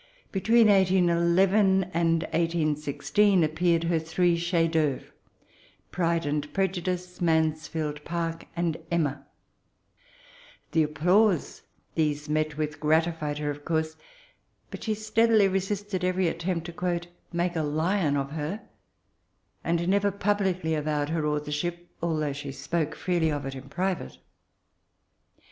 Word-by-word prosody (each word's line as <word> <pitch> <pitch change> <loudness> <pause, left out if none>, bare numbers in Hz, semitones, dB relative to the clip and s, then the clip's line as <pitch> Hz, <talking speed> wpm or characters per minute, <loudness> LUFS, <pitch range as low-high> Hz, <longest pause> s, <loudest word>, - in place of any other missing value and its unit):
Between 225 +4 +4
1811 190 +1 +4
and 165 -1 +2
1816 165 +4 +1
appeared 165 +2 +1
her 165 -1 +1
three 170 +2 +1
chefs 170 -1 +1
^'autre 150 -4 +1 0.5
— - - -31
Pride 170 -1 0
and 145 0 -2
Pre 195 -1 +2
judice, 180 0 -4
Mansfidd 155 -2 0
Park, 165 0 -3
and 170 -2 -1
Emma, 145 -5 -1 1.4
The 165 - +3
applause 175 +5 +2 0.3
these 150 -2 0
met 155 0 -1
with, 150 -1 -3
grati 160 +2 +2
fied 150 -2 -3
her, 150 -1 -2
of 145 0 -9
course; 160 0 -1 0.8
but - - -7
she 215 -1 0
steadily 215 0 +3
resisted 195 0 -2
every 185 0 +1
attempt 170 0 -2
to 175 0 -2 0.2
*< - - -40
make 175 0 -1
a 160 - +1
Hon 155 +1 +1
of 140 0 -2
her," 160 +7 -4 1.0
and 170 +1 0
never 200 +1 +2
publidy 190 -4 0
avowed 150 -1 -1
her 160 -2 0
authorship, 150 +4 -3
although 155 -4 -1
she 145 0 -6
spoke 150 +3 -2
freely 170 -3 0
of 145 -2 -3
it 135 - -4
in 135 0 -10
private. 185 - -2
165 Hz, 130 wpm, -27 LUFS, 150-180 Hz, 1.4 s, Between